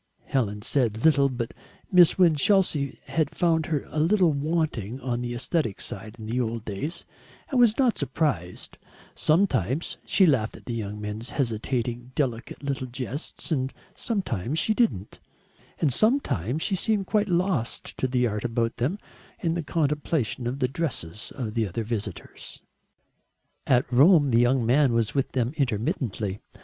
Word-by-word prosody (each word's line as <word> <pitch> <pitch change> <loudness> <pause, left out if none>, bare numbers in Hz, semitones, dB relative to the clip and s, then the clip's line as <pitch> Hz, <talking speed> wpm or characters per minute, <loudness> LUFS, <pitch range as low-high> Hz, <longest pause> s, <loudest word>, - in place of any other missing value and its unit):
Helen 105 -6 -1
said 115 -3 +1
little, 140 -3 +5
but 120 -2 -4 0.4
Miss 180 -3 +6
Winchelsea 165 -4 +3
had 160 -3 0
found 165 -2 +2
her 150 -4 -1
a 155 - -3
little 175 +1 +4
wanting 140 - -1
on 120 -2 -2
the 120 0 -3
aesthetic 120 - -1
side 105 +3 -5
in 110 - -8
the 120 +3 -1
old 115 -1 -3
days 135 - -4 0.5
and 260 - +2
was 235 -3 +5
not 255 -4 +2
surprised; 135 - -2 0.3
sometimes 155 - +1
she 190 - +4
laughed 125 -9 +1
at - - -17
the 120 - -4
young 105 -2 -4
man's 105 +3 -5
hesitating 120 0 -2
delicate 130 0 -2
little 135 -2 -2
jests 130 +7 -6
and 135 -3 -1 0.2
sometimes 155 - -2
she 220 - +2
didn't, 215 - 0 0.6
and 145 -5 +3
sometimes 160 - +2
she 195 - 0
seemed 205 +1 0
quite 210 0 +1
lost 175 - -1
to 130 - +1
the 125 -1 +1
art 105 -2 -2
about 115 -1 -1
them 135 - 0 0.4
in 165 -2 0
the 170 - -1
contemplation 150 -6 -1
of 125 +3 -2
the 130 -2 +1
dresses 115 - -4
of 115 -6 -4
the 115 -2 0
other 105 +5 -3
visitors. 110 -1 -6 1.0
At 125 0 +4
Rome 145 +1 +6
the 115 +1 +5
young 120 0 +2
man 130 +1 +4
was 115 -2 +1
with 135 -2 -1
them 125 0 0
intermittently. 115 - -1
130 Hz, 155 wpm, -26 LUFS, 115-160 Hz, 1.0 s, Miss